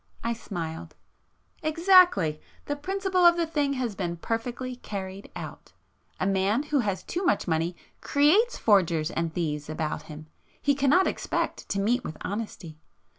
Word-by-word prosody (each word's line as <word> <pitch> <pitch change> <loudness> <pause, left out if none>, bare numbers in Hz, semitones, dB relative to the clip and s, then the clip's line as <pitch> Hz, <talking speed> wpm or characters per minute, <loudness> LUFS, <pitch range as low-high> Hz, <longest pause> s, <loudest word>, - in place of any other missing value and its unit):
I 235 - 0
smiled. 165 -7 -6 0.7
"Exactly! 320 - +4 0.2
The 290 - -2
principle 380 +4 0
of 345 0 +7
the 340 - +1
thing 295 -3 0
has 250 -5 -2
been 175 -3 -3
perfectly 245 +5 -3
carried 195 -3 -7
out. - - -8 0.5
A - - 0
man 195 +6 +1
who 295 -1 0
has 200 -6 -1
too 360 - -3
much 355 - +1
money 165 +1 0 0.3
creates 350 +13 +3
forgers 170 -7 +3
and 165 -1 -2
thieves 150 -3 -3
about 155 -1 -3
him,—he 155 - -4
cannot 285 +7 +4
expect - - -2
to 200 - -1
meet 240 +5 +1
with 155 - -6
honesty. 195 -7 -5
215 Hz, 145 wpm, -27 LUFS, -, 0.7 s, of